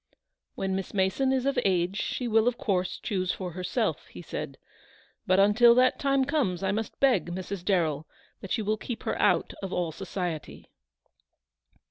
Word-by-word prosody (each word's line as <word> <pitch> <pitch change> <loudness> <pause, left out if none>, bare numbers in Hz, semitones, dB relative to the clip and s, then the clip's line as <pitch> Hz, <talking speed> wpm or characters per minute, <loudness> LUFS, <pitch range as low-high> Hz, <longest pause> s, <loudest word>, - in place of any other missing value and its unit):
" - - -57
When 190 -1 -2
Miss 195 +1 -5
Mason 195 +8 +1
is 260 -1 0
of 275 - +1
age 185 +1 +1
she 250 - -2
will 225 0 +3
of 245 -1 +1
course 185 -6 -1
choose 185 -3 -1
for 180 -2 -5
herself," 180 +1 -2
he - - -11
said; - - -6 0.7
"but 185 +1 +4
until 225 +4 +6
that 255 +1 +3
time 275 -1 +2
comes 255 - 0
I 190 - +1
must 220 +1 -4
beg, 270 -8 +3
Mrs. 185 +1 -5
Darrell, 160 -6 0 0.3
that 195 - -3
you 220 - -3
will 215 +1 +1
keep 230 +2 -6
her - - -1
out - - +2
of 195 -2 -5
all 175 -3 -1
society." 175 -2 -5
195 Hz, 175 wpm, -27 LUFS, 185-240 Hz, 0.7 s, until